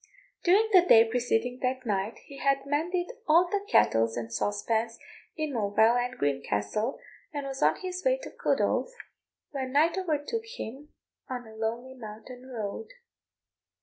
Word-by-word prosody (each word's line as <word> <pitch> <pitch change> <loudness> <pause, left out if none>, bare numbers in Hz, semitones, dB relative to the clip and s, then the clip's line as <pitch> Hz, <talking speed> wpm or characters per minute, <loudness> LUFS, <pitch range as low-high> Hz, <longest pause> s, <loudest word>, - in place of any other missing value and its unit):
During 400 +5 +5
the 370 - +9
day 230 -10 +7
preceding 245 +1 0
that 255 0 -1
night, 205 0 -1
he 275 - -11
had 275 0 +1
mended 345 - -1 0.2
all 335 +3 +6
the 400 +2 -1
kettles 115 0 +4
and 115 -1 -5
saucepans 225 - -1 0.4
in 310 -2 -2
Moville 220 +1 +3
and 250 +1 -5
Greencastle, 140 - -1 0.3
and 290 -2 -4
was 270 +1 -5
on - - +4
his 365 0 -4
way - - +3
to - - -7
Culdaff, - - +1 0.6
when 265 -2 -4
night 325 +6 +3
overtook 365 +6 -2
him 275 +6 -7 0.4
on 250 -2 -4
a 220 - -12
lonely 230 +4 -3
mountain 245 +2 -10
road. 230 - -5
255 Hz, 150 wpm, -28 LUFS, 220-305 Hz, 0.6 s, the